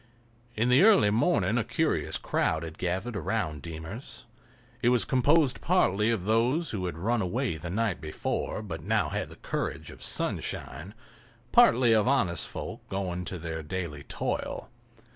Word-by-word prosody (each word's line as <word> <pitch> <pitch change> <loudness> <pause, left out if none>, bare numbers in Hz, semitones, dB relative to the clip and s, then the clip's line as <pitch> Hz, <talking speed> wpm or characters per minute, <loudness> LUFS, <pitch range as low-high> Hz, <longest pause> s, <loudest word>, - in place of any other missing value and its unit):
In 115 +3 +1
the 125 +3 +6
early 200 - +6
morning 115 - +2
a - - 0
curious - - 0
crowd 80 0 0
had 80 -1 -8
gathered 95 +6 -2
about 95 -7 -2
"Deemer's." 85 - -8 0.6
It 120 - +4
was 125 -2 +3
composed 140 +2 +3
partly 110 - +2
of 110 -6 0
those 120 - +1
who 95 -4 -2
had 85 -3 -5
run 115 +6 0
away 105 0 -1
the 85 +3 -6
night 105 +1 -1
before, 80 +7 -3
but 85 -6 -6
now - - +1
had - - -3
the - - -12
courage - - -4
of - - -14
sunshine, 85 +11 -1 0.6
partly 130 - +6
of 110 +1 +3
honest 100 - +1
folk - - -7
going 90 -2 -3
to 95 - -4
their 80 -1 -5
daily 80 -2 -5
toil. - - -3
105 Hz, 160 wpm, -28 LUFS, 85-120 Hz, 0.6 s, the